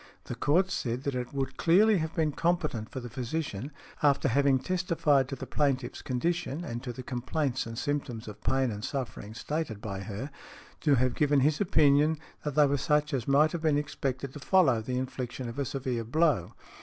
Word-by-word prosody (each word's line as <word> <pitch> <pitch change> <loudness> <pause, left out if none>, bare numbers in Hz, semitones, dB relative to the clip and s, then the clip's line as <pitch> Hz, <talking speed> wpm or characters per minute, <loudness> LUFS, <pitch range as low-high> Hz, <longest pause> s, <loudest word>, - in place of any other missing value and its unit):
The - - -6
Court 185 +6 +2
said 125 -6 -2
that 140 - -1
it 125 -1 -3
would 135 -1 -3
clearly 200 +4 +5
have 160 0 -3
been 155 -2 +1
competent 155 -9 -1
for 130 - -5
the 120 - -7
physician, 125 0 -4 0.3
after 140 -1 +3
having 140 +2 +4
testified 160 -5 +1
to 135 - -3
the 135 - -7
plaintiff's 130 0 -1
condition 165 +4 -2
and 120 -6 -4
to 125 -2 -5
the 125 +2 -8
complaints 130 +1 -2
and 115 0 -7
symptoms 140 -6 -3
of 105 0 -9
pain 130 -2 +1
and 105 0 -6
sufferings 120 -5 -5
stated 150 -9 -3
by 100 -3 -5
her, 110 +8 -6 0.5
to 145 -3 +3
have 130 0 +2
given 145 0 +3
his 150 +5 +2
opinion 155 -3 +4 0.3
that 150 -2 -3
they 150 -1 +6
were 140 0 +1
such 150 +1 +1
as 125 -4 -1
might 145 +3 +4
have 170 - -3
been 155 -3 +3
expected 135 -2 -3
to 145 - -8
follow 140 -8 +3
the 125 +3 -3
infliction 130 0 -4
of 115 +4 -6
a 140 - 0
severe 130 -3 -2
blow. 135 - +1
135 Hz, 195 wpm, -29 LUFS, 125-150 Hz, 0.5 s, they